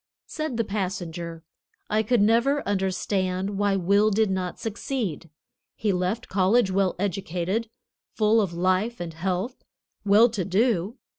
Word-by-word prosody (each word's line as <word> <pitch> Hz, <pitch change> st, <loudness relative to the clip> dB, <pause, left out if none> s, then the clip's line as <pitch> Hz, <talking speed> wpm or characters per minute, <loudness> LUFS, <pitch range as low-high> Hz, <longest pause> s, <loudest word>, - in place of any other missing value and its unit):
Said 310 Hz, -6 st, -4 dB
the 230 Hz, -, +2 dB
passenger: 175 Hz, -5 st, -4 dB, 0.4 s
"I 215 Hz, +1 st, +2 dB
could 220 Hz, 0 st, +2 dB
never 235 Hz, +7 st, +2 dB
understand 190 Hz, 0 st, -1 dB
why 205 Hz, -1 st, +2 dB
Will 200 Hz, +3 st, +3 dB
did 215 Hz, -1 st, +2 dB
not 185 Hz, -2 st, -3 dB
succeed. 220 Hz, -, -4 dB, 0.5 s
He 210 Hz, -3 st, 0 dB
left 185 Hz, +6 st, -1 dB
college 195 Hz, +2 st, +2 dB
well 190 Hz, -1 st, +1 dB
educated, 190 Hz, +3 st, -2 dB, 0.5 s
full 220 Hz, +1 st, +4 dB
of 195 Hz, -5 st, -1 dB
life 185 Hz, +7 st, 0 dB
and 170 Hz, -2 st, -5 dB
health, 185 Hz, +8 st, -3 dB, 0.4 s
well 210 Hz, +3 st, +6 dB
to 210 Hz, -5 st, -2 dB
do. 205 Hz, +2 st, +1 dB
195 Hz, 135 wpm, -25 LUFS, 185-220 Hz, 0.5 s, well